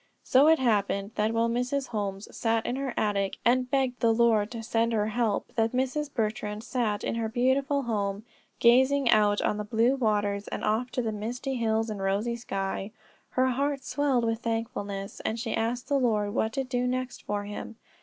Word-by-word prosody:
So 270 +4 +5
it 320 0 +6
happened 205 -5 +1
that 215 +1 +1
while 230 0 +2
Mrs. 250 +4 -1
Holmes 200 -2 -3
sat 225 -1 0
in 245 - -1
her 270 -1 -2
attic, 200 -2 0
and 250 +1 +3
begged 260 -2 0
the 230 - +3
Lord 225 -2 +3
to 230 -1 -6
send 230 +1 +1
her 215 -1 +1
help, 225 -2 -1
that 225 0 +1
Mrs. 265 +3 -1
Bertrand 215 -2 -2
sat 230 -4 -1
in - - -1
her 230 -1 -2
beautiful 270 +4 +1
home, 205 -3 -2 0.4
gazing 260 +2 +5
out 210 -1 +4
on 210 - +1
the 210 - -2
blue 225 +4 +2
waters, 205 -4 0
and - - -5
off 220 +4 0
to 250 - 0
the 225 - -1
misty 240 +6 -4
hills 225 -1 0
and 205 -2 -5
rosy 200 +5 0
sky. 195 -3 -3 0.4
Her 255 0 +2
heart 275 +2 -1
swelled 270 -5 +1
with 225 0 0
thankfulness, 225 -4 -4
and 225 +1 -2
she 225 -1 -2
asked 240 +2 -1
the 280 -2 +2
Lord 210 -5 +1
what 220 -1 0
to 270 - -1
do 250 -1 -1
next 255 0 -3
for 205 0 -3
him. 210 +2 -7
230 Hz, 195 wpm, -28 LUFS, 210-255 Hz, 0.4 s, it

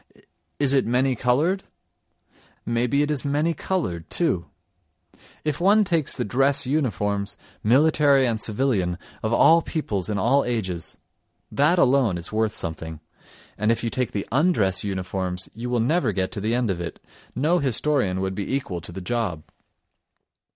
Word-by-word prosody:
Is 140 -1 +3
it 135 - +4
many 125 +2 +2
coloured? 150 - +1 1.0
May 115 +1 0
be 140 +4 +2
it 150 - -1
is 145 -4 -1
many 150 +4 +1
coloured, 95 - -3
too: 90 - 0 1.0
if 150 +1 -1
one 205 +4 +5
takes 165 -7 0
the - - -1
dress 135 +5 +1
uniforms, 105 -8 -1 0.3
military 140 +2 +4
and 115 -3 -1
civilian, 105 -7 0 0.2
of 110 - -2
all 165 +7 +6
peoples 110 - -3
in 105 - -1
all 135 +7 +3
ages—that 120 - -2
alone 130 - +3
is 85 - -7
worth 110 0 +1
something, 80 -3 -5 0.6
and 105 +2 +2
if 115 - -1
you 115 - -1
take 125 -2 -1
the 100 -3 -4
undress 130 - +2
uniforms 95 -1 -2
you 120 +3 -5
will 120 -1 +1
never 130 +1 +2
get 95 0 -1
to 100 - -5
the 110 +3 0
end 120 -4 +1
of 85 -2 -4
it; 85 - -6 0.4
no 155 +8 +2
historian 130 - 0
would 95 0 -2
be 100 +6 -2
equal 100 -11 -3
to 85 - -9
the 95 +2 -7
job. 95 -6 -2
120 Hz, 160 wpm, -24 LUFS, 100-140 Hz, 1.0 s, all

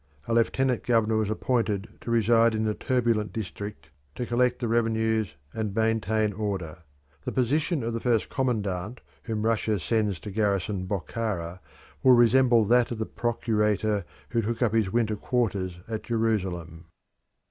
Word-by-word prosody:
A - - 0
lieutenant 125 +2 +2
governor 115 -2 +2
was 110 -2 0
appointed 110 -3 0
to - - -7
reside 115 0 +4
in 110 - 0
the 110 -1 +1
turbulent 115 -3 0
district 105 -5 -6 0.2
to 125 - -3
collect 125 +1 +1
the 120 - -2
revenues 110 -4 +1 0.2
and 110 -3 -3
maintain 110 -1 +1
order. 95 -6 -4 0.4
The - - -3
position 145 +4 +1
of 115 +1 -2
the 115 - -2
first 115 -2 +1
commandant 105 -4 -2 0.2
whom 110 -2 -3
Russia 110 -2 +1
sends 105 -1 0
to 105 - -7
garrison 100 -2 0
Bokhara 95 -3 -3 0.4
will 130 - +7
resemble 120 -1 +5
that 120 +2 +4
of 120 - -4
the 110 - -2
procurator 105 -3 0 0.3
who 115 -1 +1
took 115 +3 -1
up 115 -3 +1
his 110 -4 +2
winter 110 -1 +1
quarters 100 -6 -1
at 110 -1 -3
Jerusalem. 95 -8 -2
110 Hz, 150 wpm, -27 LUFS, 105-120 Hz, 0.4 s, will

